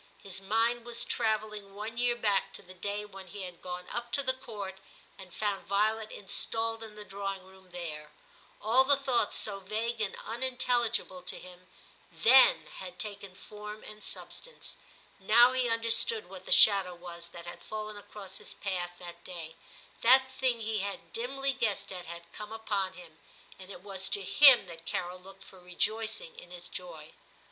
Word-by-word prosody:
His 195 -1 -1
mind 225 +4 +1
was 235 0 -2
travelling 215 -2 -1
one 215 +2 -5
year 240 0 +2
back 205 -4 +1
to - - -8
the 185 0 -12
day 205 +3 -3
when 195 -2 -11
he 200 +2 -7
had 180 -2 -9
gone 180 0 -6
up 240 0 -4
to 280 - +3
the 260 0 +1
Court 205 -7 -7 0.4
and 190 -2 -12
found 205 +1 -2
Violet 215 +2 +1
installed 225 +3 -1
in 220 -1 -9
the 210 0 -8
drawing 195 -1 -4
room 190 0 -18
there; 155 -4 -6 0.5
all 235 +5 +5
the 280 +1 +5
thoughts 270 -3 +1
so 200 -2 0
vague 220 +4 -2
and 210 - -1
unintelligible 250 +1 0
to - - -4
him 180 0 -13 0.4
then 235 -10 +7
had 180 -1 -8
taken 200 -3 -6
form 210 +2 -9
and 215 0 -10
substance; - - -7 0.4
now 235 +5 +7
he 255 -2 +1
understood 230 - +2
what - - -11
the - - -5
shadow 195 - +6
was 170 -1 -9
that 170 0 -11
had 175 0 -8
fallen 215 +1 -5
across 205 -1 -9
his - - -4
path 175 -3 -3
that 175 -1 -10
day; 165 -3 -7 0.5
that 260 +2 +6
thing 255 -3 0
he 220 -1 -1
had 195 -4 -5
dimly 270 +3 -1
guessed 205 -5 -1
at 180 -2 -7
had 170 0 -9
come 210 0 -8
upon 205 -4 -2
him, 165 -3 -14 0.4
and 185 0 -11
it 185 - -9
was 190 -2 -3
to 200 - -1
him 265 +2 +8
that 165 -2 -11
Carol 180 +1 -3
looked 195 +1 -14
for 190 -1 -15
rejoicing 220 - -2
in - - -14
his - - -9
joy. - - -8
210 Hz, 175 wpm, -31 LUFS, 185-230 Hz, 0.5 s, him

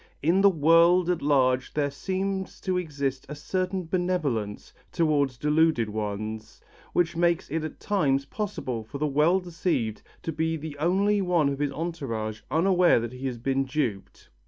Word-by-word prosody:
In 175 +6 +3
the 200 - +7
world 170 +2 +4
at 175 - -2
large 130 -3 +2
there 145 -2 0
seems 190 +3 -3
to 185 -2 -1
exist 140 -6 -2
a 150 - -5
certain 185 +4 -2
benevolence 160 - -2 0.2
towards 145 -6 +1
deluded 150 -4 +2
ones, 110 +1 -5 0.3
which 170 -1 +1
makes 170 0 +1
it 160 0 -1
at 155 - -6
times 140 -10 +1
possible 140 - -4
for 125 +6 -8
the 150 - -1
well 150 +6 +3
deceived 165 - -2 0.2
to 165 - -2
be 160 +1 -1
the 155 -1 -7
only 195 +5 +2
one 175 -6 +2
of 140 0 -3
his 145 -1 0
entourage 115 -10 -4
unaware 175 +1 +4
that 115 +1 -5
he 130 +1 -4
has 125 -2 -4
been 135 +3 0
duped. 130 -8 -4
155 Hz, 160 wpm, -26 LUFS, 135-175 Hz, 0.3 s, the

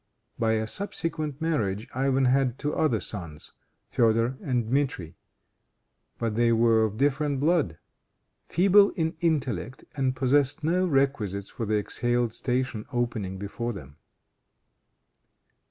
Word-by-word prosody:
By 110 -1 +2
a 110 0 0
subsequent 155 - -3
marriage 110 - -1
Ivan 135 0 +2
had 130 -1 +2
two 150 +1 -2
other 125 -9 +1
sons, 85 -9 -6 0.4
Feodor 115 +1 +2
and 125 -4 0
Dmitri. 115 - -1 1.0
But 115 -2 -1
they 115 +1 +3
were 115 -1 +4
of 110 0 -4
different 140 +1 +1
blood; 150 - +1 0.7
feeble 200 +3 +5
in 160 -2 -1
intellect 130 - -1
and 130 -2 0
possessed 140 +2 +2
no 180 +4 +2
requisites 125 - 0
for 115 - -4
the 110 - +1
exalted 120 +2 0
station 125 -2 -2
opening 120 -6 -2
before 115 +4 -4
them. 70 -7 -11
125 Hz, 120 wpm, -27 LUFS, 110-145 Hz, 1.0 s, feeble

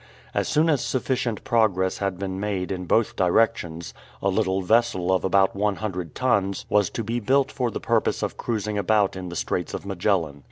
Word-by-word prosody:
As - - 0
soon 155 +2 +2
as 150 -5 +2
sufficient 125 -3 -1
progress 100 -5 +1
had 95 -2 -2
been 95 0 -4
made 100 -3 -2
in 90 -1 -3
both 110 +5 +1
directions, 90 -3 +1 0.3
a 100 - 0
little 95 -1 0
vessel 110 -4 +2
of 95 - +1
about 95 +1 +3
one 100 0 +1
hundred 90 -6 -5
tons 100 -7 0
was 105 -3 +3
to 115 - -4
be 115 +3 -2
built 135 +4 +2
for 125 -2 -1
the - - -5
purpose - - 0
of - - -2
cruising 105 -2 -2
about 100 0 +2
in 95 -1 -6
the 85 - -7
Straits - - -2
of - - -7
Magellan. 90 -6 0
100 Hz, 195 wpm, -24 LUFS, 95-115 Hz, 0.3 s, about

